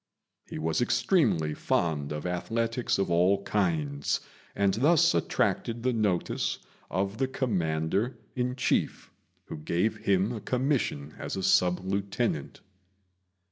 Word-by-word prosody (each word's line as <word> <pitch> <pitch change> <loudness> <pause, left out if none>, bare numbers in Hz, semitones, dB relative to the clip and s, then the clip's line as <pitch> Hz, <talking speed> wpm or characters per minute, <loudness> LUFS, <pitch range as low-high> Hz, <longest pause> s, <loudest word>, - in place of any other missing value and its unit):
He - - -6
was 80 +6 0
extremely 120 - +2
fond 75 -3 -1
of 75 +2 -4
athletics 115 +7 -1
of 95 -2 0
all 95 +4 +3
kinds, 80 -9 0 0.4
and 100 -1 +2
thus 145 - +4
attracted 115 0 0
the 125 0 +2
notice 105 -6 0 0.3
of 100 +3 -2
the 135 - +2
Commander 95 - -1 0.2
in 125 0 -1
Chief, 130 - -1 0.3
who - - -7
gave 90 +8 0
him 100 0 +1
a 115 -3 -5
commission 125 - -1
as 95 - -3
sub 90 0 +3
lieutenant. 100 - -2
100 Hz, 120 wpm, -28 LUFS, 85-120 Hz, 0.4 s, thus